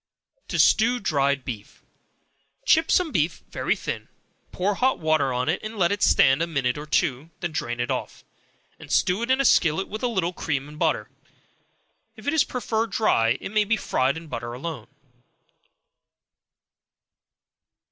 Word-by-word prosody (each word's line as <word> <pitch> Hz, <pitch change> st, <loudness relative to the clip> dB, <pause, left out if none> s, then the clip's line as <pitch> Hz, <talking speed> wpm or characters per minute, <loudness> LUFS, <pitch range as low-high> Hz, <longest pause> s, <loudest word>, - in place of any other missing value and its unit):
To -, -, -3 dB
Stew 240 Hz, +3 st, +4 dB
Dried 140 Hz, -, 0 dB
Beef. 110 Hz, -5 st, -8 dB, 0.8 s
Chip 320 Hz, -6 st, +4 dB
some 355 Hz, -4 st, +2 dB
beef 160 Hz, -, -1 dB
very -, -, 0 dB
thin, -, -, -5 dB, 0.4 s
pour 195 Hz, +3 st, 0 dB
hot 260 Hz, +6 st, +1 dB
water 155 Hz, -4 st, +1 dB
on 125 Hz, +1 st, -1 dB
it, 165 Hz, +4 st, 0 dB
and 215 Hz, +1 st, -7 dB
let 175 Hz, -2 st, +2 dB
it 205 Hz, 0 st, -2 dB
stand 135 Hz, -4 st, +4 dB
a 170 Hz, -, +1 dB
minute 130 Hz, -6 st, -1 dB
or 150 Hz, +1 st, -7 dB
two, 140 Hz, +1 st, 0 dB
then 175 Hz, -2 st, -3 dB
drain 120 Hz, -5 st, -3 dB
it 120 Hz, -, -1 dB
off, -, -, -5 dB, 0.5 s
and -, -, -11 dB
stew 185 Hz, +4 st, +2 dB
it 235 Hz, -, -3 dB
in 260 Hz, +1 st, +3 dB
a 275 Hz, -, +2 dB
skillet 165 Hz, -3 st, +3 dB
with 215 Hz, +2 st, -6 dB
a 250 Hz, -, +1 dB
little 185 Hz, -7 st, -1 dB
cream 145 Hz, -5 st, -3 dB
and 150 Hz, +1 st, -12 dB
butter. -, -, +1 dB, 1.1 s
If -, -, -14 dB
it 285 Hz, -, 0 dB
is 320 Hz, -, +4 dB
preferred 230 Hz, -2 st, -2 dB
dry, 120 Hz, -, +2 dB
it -, -, -6 dB
may 215 Hz, 0 st, +3 dB
be 220 Hz, +2 st, +1 dB
fried 130 Hz, -5 st, 0 dB
in 165 Hz, -, -9 dB
butter 120 Hz, -5 st, -6 dB
alone. 130 Hz, -3 st, -6 dB
165 Hz, 165 wpm, -24 LUFS, 135-215 Hz, 1.1 s, Stew